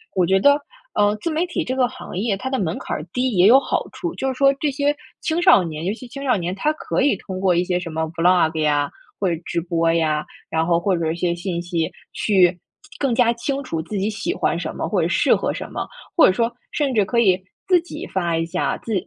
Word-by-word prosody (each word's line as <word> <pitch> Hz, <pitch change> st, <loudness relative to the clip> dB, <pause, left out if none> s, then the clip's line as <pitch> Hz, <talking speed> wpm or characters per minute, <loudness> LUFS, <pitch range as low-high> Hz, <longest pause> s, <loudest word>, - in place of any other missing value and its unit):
我 185 Hz, -2 st, +3 dB
觉 190 Hz, +2 st, +3 dB
得， 285 Hz, +7 st, +5 dB, 0.4 s
呃， 205 Hz, 0 st, +3 dB
自 335 Hz, -, -3 dB
媒 320 Hz, +3 st, 0 dB
体 345 Hz, -1 st, -2 dB
这 255 Hz, -, -3 dB
个 255 Hz, -2 st, +3 dB
行 250 Hz, -7 st, -9 dB
业 205 Hz, 0 st, 0 dB
它 260 Hz, +5 st, -4 dB
的 265 Hz, -, 0 dB
门 170 Hz, -4 st, -1 dB
槛 -, -, -4 dB
儿 -, -, -6 dB
低 255 Hz, 0 st, 0 dB
也 180 Hz, 0 st, +5 dB
有 255 Hz, +5 st, +8 dB
好 -, -, -2 dB
处。 345 Hz, -1 st, -5 dB
就 265 Hz, -, -2 dB
是 265 Hz, -, 0 dB
说 275 Hz, +1 st, +4 dB
这 295 Hz, -, +1 dB
些 285 Hz, +1 st, 0 dB, 0.3 s
青 320 Hz, +1 st, 0 dB
少 350 Hz, -, +6 dB
年， 160 Hz, -1 st, -5 dB
尤 195 Hz, -, 0 dB
其 250 Hz, +2 st, -10 dB
青 275 Hz, +3 st, -8 dB
少 255 Hz, -, +3 dB
年， 180 Hz, -2 st, -2 dB
他 300 Hz, +10 st, 0 dB
可 310 Hz, -, -2 dB
以 285 Hz, -, +3 dB
通 185 Hz, -2 st, -7 dB
过 190 Hz, -1 st, +3 dB
一 175 Hz, -, +2 dB
些 180 Hz, 0 st, 0 dB
什 175 Hz, -1 st, -6 dB
么 160 Hz, +1 st, -2 dB
Vlog 165 Hz, -2 st, +3 dB
呀， 145 Hz, -2 st, +1 dB, 0.3 s
或 195 Hz, -, +1 dB
者 165 Hz, -, -4 dB
直 170 Hz, -, -1 dB
播 165 Hz, -1 st, +1 dB
呀， 155 Hz, -2 st, +1 dB, 0.2 s
然 160 Hz, 0 st, 0 dB
后 170 Hz, -1 st, +3 dB
或 185 Hz, +1 st, +1 dB
者 160 Hz, -1 st, -1 dB
一 -, -, -3 dB
些 175 Hz, 0 st, 0 dB
信 175 Hz, 0 st, -3 dB
息， 170 Hz, -2 st, -2 dB, 0.2 s
去 185 Hz, -4 st, +3 dB, 0.4 s
更 270 Hz, -5 st, +1 dB
加 240 Hz, -1 st, +4 dB
清 275 Hz, +4 st, -3 dB
楚 165 Hz, -11 st, -3 dB
自 200 Hz, +6 st, -5 dB
己 195 Hz, +2 st, 0 dB
喜 220 Hz, +11 st, -2 dB
欢 -, -, 0 dB
什 -, -, -5 dB
么 -, -, -2 dB
或 -, -, +1 dB
者 -, -, +1 dB
适 -, -, +3 dB
合 -, -, -1 dB
什 -, -, -7 dB
么。 -, -, -4 dB, 0.3 s
或 -, -, +8 dB
者 -, -, +3 dB
说 230 Hz, +4 st, 0 dB, 0.2 s
甚 280 Hz, -4 st, 0 dB
至 210 Hz, -3 st, +3 dB
可 235 Hz, +4 st, 0 dB
以 190 Hz, -5 st, +3 dB, 0.3 s
自 360 Hz, -3 st, +4 dB
己 350 Hz, -, -8 dB
发 175 Hz, -3 st, -1 dB
一 165 Hz, -, 0 dB
下 165 Hz, -, -1 dB
自 225 Hz, -, -5 dB
195 Hz, 285 characters per minute, -21 LUFS, 170-260 Hz, 0.4 s, 有